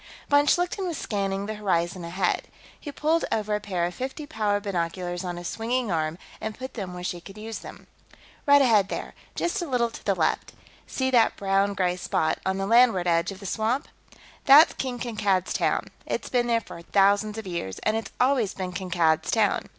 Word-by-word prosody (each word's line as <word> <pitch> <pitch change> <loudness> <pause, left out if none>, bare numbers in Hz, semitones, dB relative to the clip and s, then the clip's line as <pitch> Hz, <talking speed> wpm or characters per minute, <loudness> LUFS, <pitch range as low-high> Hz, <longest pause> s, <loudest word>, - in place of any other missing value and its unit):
Von 285 0 +4
Schlichten 355 +4 +1
was 335 -4 -3
scanning 195 -1 -2
the 215 - -3
horizon 185 -4 -1
ahead. 180 +2 -1 0.3
He 290 - -7
pulled 315 +4 +1
over 215 -1 0
a 210 - +1
pair 185 -5 -1
of 175 - -3
fifty 265 - -5
power 210 -8 0
binoculars 175 -2 -3
on 175 -1 -4
a 175 - -7
swinging 230 +2 -1
arm 160 0 -1 0.2
and 220 0 -4
put 260 +1 -7
them 190 -5 -5
where 180 - -7
she 175 -1 -3
could 195 +3 -12
use 220 +1 -6
them. - - -11 0.6
"Right 285 0 +7
ahead, 210 -6 +4
there; - - -5 0.2
just 345 +3 -1
a 345 - -3
little 240 -4 +1
to - - -10
the - - +1
left. - - 0 0.3
See 260 0 -1
that 235 -3 +4
brown 195 0 +1
gray 180 -2 0
spot 160 -3 0
on 190 0 0
the 195 - -1
landward 230 -4 +5
edge 170 +1 +2
of 195 - -9
the 200 - -10
swamp? 225 - -1 0.6
That's 295 +5 +8
King 255 -2 -3
Kankad's 215 -6 0
Town. - - +1 0.2
It's - - -3
been 245 -1 +1
there 230 -1 +2
for 170 - -10
thousands 205 +4 +2
of 220 - -6
years, 170 - -4
and 215 - +1
it's 225 -2 -3
always 250 -5 +2
been 185 -1 -4
Kankad's 170 -4 +1
Town. 215 -3 +1
205 Hz, 200 wpm, -26 LUFS, 180-245 Hz, 0.6 s, That's